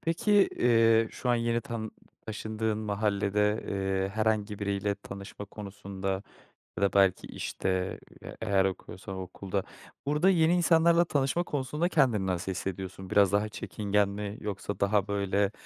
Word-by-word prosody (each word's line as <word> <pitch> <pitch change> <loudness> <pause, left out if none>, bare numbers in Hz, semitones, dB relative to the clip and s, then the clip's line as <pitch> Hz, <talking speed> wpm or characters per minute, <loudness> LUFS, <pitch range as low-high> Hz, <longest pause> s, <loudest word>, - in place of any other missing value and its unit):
Peki, 165 +6 0 0.3
eee, 115 -2 +4
şu 125 - -5
an - - +4
yeni 115 0 +1
tanı 115 -5 -5 0.4
taşındığın 110 0 -2
mahallede, 105 0 0
eee, 95 -1 0
herhangi 110 -1 0
biriyle 100 0 -1
tanışma 100 +1 -9
konusunda 100 -1 -5 0.6
ya - - 0
da 100 - +2
belki, 95 -2 +3
işte, 95 0 -2 0.2
eee, - - -9
eğer 95 -1 +2
okuyorsan 95 +1 -5
okulda... 95 +1 -4 0.4
Burada 150 +6 +3
yeni 170 -2 +4
insanlarla 170 0 +4
tanışma 145 +4 +1
konusunda 150 +4 -1
kendini 125 - +3
nasıl 90 +1 -1
hissediyorsun? 95 0 -5
Biraz 100 -2 +4
daha 105 +1 +1
çekingen 105 -2 0
mi 105 +1 -5
yoksa 100 0 -4
daha, 100 0 +2
böyle, 100 0 +1
105 Hz, 140 wpm, -29 LUFS, 100-115 Hz, 0.6 s, eee